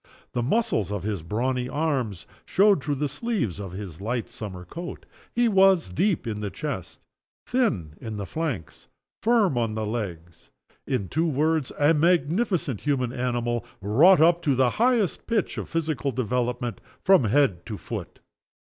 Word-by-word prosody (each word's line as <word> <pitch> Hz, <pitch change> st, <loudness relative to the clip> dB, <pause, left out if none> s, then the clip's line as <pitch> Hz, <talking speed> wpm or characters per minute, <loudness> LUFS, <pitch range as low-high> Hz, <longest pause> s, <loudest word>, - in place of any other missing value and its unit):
The 120 Hz, -, -1 dB
muscles 120 Hz, -, +1 dB
of 100 Hz, -4 st, -3 dB
his 100 Hz, -4 st, -2 dB
brawny 125 Hz, +8 st, -1 dB
arms 130 Hz, -, -1 dB, 0.2 s
showed 200 Hz, -5 st, +3 dB
through 145 Hz, -1 st, -1 dB
the 145 Hz, +2 st, -1 dB
sleeves 145 Hz, -, -2 dB
of 95 Hz, -3 st, -6 dB
his 95 Hz, -4 st, -7 dB
light 115 Hz, +3 st, -2 dB
summer 95 Hz, -4 st, -7 dB
coat. 170 Hz, -, -7 dB, 0.3 s
He 240 Hz, 0 st, +3 dB
was 190 Hz, -, +4 dB
deep 190 Hz, -, +1 dB
in 110 Hz, -2 st, -3 dB
the 105 Hz, -, -2 dB
chest, -, -, -5 dB, 0.4 s
thin 110 Hz, -, 0 dB
in 110 Hz, -2 st, -5 dB
the 100 Hz, -, -4 dB
flanks, 135 Hz, -, -4 dB, 0.3 s
firm 215 Hz, -, +3 dB
on 115 Hz, -2 st, -1 dB
the 110 Hz, 0 st, -2 dB
legs 90 Hz, -7 st, -5 dB, 0.4 s
in 125 Hz, -8 st, -1 dB
two 160 Hz, -, 0 dB
words 155 Hz, -1 st, +1 dB
a 145 Hz, +2 st, +4 dB
magnificent 165 Hz, -, +1 dB
human 130 Hz, -4 st, 0 dB
animal, 120 Hz, -2 st, -1 dB, 0.2 s
wrought 140 Hz, -, +5 dB
up 170 Hz, +2 st, +5 dB
to 145 Hz, -5 st, +2 dB
the 125 Hz, -1 st, +3 dB
highest 235 Hz, -6 st, +2 dB
pitch 225 Hz, -5 st, 0 dB
of -, -, -6 dB
physical 155 Hz, -5 st, -1 dB
development, 125 Hz, -2 st, -2 dB, 0.2 s
from 190 Hz, -9 st, +6 dB
head 105 Hz, -7 st, +2 dB
to 110 Hz, -3 st, -5 dB
foot. -, -, -7 dB
130 Hz, 155 wpm, -25 LUFS, 105-165 Hz, 0.4 s, from